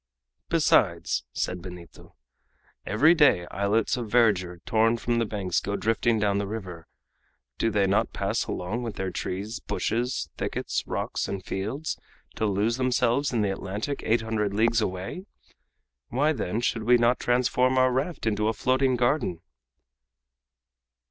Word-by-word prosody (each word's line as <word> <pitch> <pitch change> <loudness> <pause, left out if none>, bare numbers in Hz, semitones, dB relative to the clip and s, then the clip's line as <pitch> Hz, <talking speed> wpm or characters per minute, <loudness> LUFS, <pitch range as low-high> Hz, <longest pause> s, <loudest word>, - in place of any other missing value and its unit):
"Besides," - - +2
said 90 -1 -3
Benito, 90 -1 -11 0.7
"every 145 +11 +5
day 145 - +4
islets 100 +3 +1
of 120 -3 -4
verdure, 100 -7 +2
torn 115 -1 +3
from 120 0 0
the 115 - 0
banks, 95 -4 -1
go 100 - -3
drifting 115 +2 +1
down 100 -1 +1
the 100 - -2
river. 90 -6 -7 0.7
Do 115 - +2
they 105 -2 +2
not 95 +1 +1
pass - - -1
along 95 +7 -3
with 115 -4 -5
their 95 -1 -3
trees, 100 +6 -4
bushes, 120 -5 -2
thickets, - - -2
rocks, - - -2
and 95 -1 -5
fields, 115 +11 -3 0.3
to 110 - -1
lose 105 +4 +1
themselves 130 +2 +1
in 120 -3 +1
the 100 -2 +1
Atlantic 105 +8 -4
eight 115 +1 +2
hundred 105 -3 -1
leagues 115 +1 +3
away? 95 - -4 0.8
Why, 150 +5 +2
then, 110 -3 -2
should 120 -2 0
we 120 +3 +5
not 120 +1 +2
transform 125 +1 +2
our 130 0 +4
raft 135 +5 -2
into 105 -1 +1
a 110 - +1
floating 130 +3 +2
garden?" 120 - +1
110 Hz, 150 wpm, -26 LUFS, 100-125 Hz, 0.8 s, every